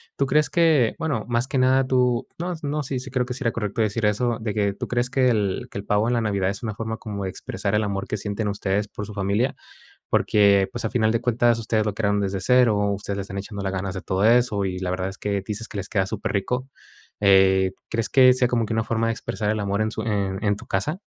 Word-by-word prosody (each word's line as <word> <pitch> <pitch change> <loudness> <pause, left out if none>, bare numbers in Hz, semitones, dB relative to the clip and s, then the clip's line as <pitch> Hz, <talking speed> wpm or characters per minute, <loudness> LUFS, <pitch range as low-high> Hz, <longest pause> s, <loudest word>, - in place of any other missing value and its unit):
Tú 140 - +1
crees 150 +2 +2
que, 160 -9 +3
bueno, 145 -10 -2
más 120 +1 0
que 135 - -2
nada 130 +1 +4
tú, 125 -2 +2
no, 175 +2 -3
no, 150 +1 -1
sí, 130 -1 -3
sí 130 -1 -9
creo 125 -1 0
que 125 - -4
sí 130 - -6
era 115 - +2
correcto 105 -1 -2
decir 110 +1 0
eso, 110 +3 +1
de 110 -2 -3
que, 100 -1 +1
¿tú - - -5
crees 120 0 0
que 130 0 +2
el 105 -5 0
que - - -7
el 100 - -4
pavo 105 +2 +2
en 120 - +1
la 120 - +1
Navidad 100 -3 0
es 100 +3 -5
una 110 -3 -2
forma 110 +1 -4
como 100 -3 -6
de - - -2
expresar 100 +2 -3
el 110 - +2
amor 100 -1 -3
que - - -2
sienten 105 +1 -3
ustedes 100 0 -1
por 105 - -7
su 105 - -9
familia?, 100 +6 0 0.5
porque, 100 -2 +4
pues, 120 - -5
a - - -1
final 110 -3 +2
de 115 - 0
cuentas 120 -1 +2
ustedes 110 -1 0
lo 105 - -1
crearon 105 -1 +1
desde 95 -1 -2
cero, 125 +1 +4 0.2
ustedes 100 0 -4
le - - -1
están 95 +1 -6
echando 100 0 -6
las 95 0 -2
ganas 95 0 -3
de 95 - -5
todo 95 +2 -1
eso, 115 -3 +3
y 90 -1 -3
la 90 -1 -2
verdad 90 +1 -2
es 95 - -11
que, 100 -1 -1
dices 110 +2 -5
que - - -9
les 100 0 -4
queda 95 -3 0
superrico. 110 +5 -2 0.5
Eh, 95 -1 +5 0.2
¿crees 115 -1 -1
que 130 -1 +6
sea 125 -1 +2
como 115 -2 0
que 110 - -4
una 110 0 +1
forma 115 0 0
de - - +1
expresar 105 -1 -3
el 110 -1 -1
amor 100 +1 0
en 110 - -1
su 110 - -4
en 100 -3 -2
en 105 -1 +1
tu - - -12
casa? 130 - -2
110 Hz, 265 wpm, -23 LUFS, 100-120 Hz, 0.5 s, que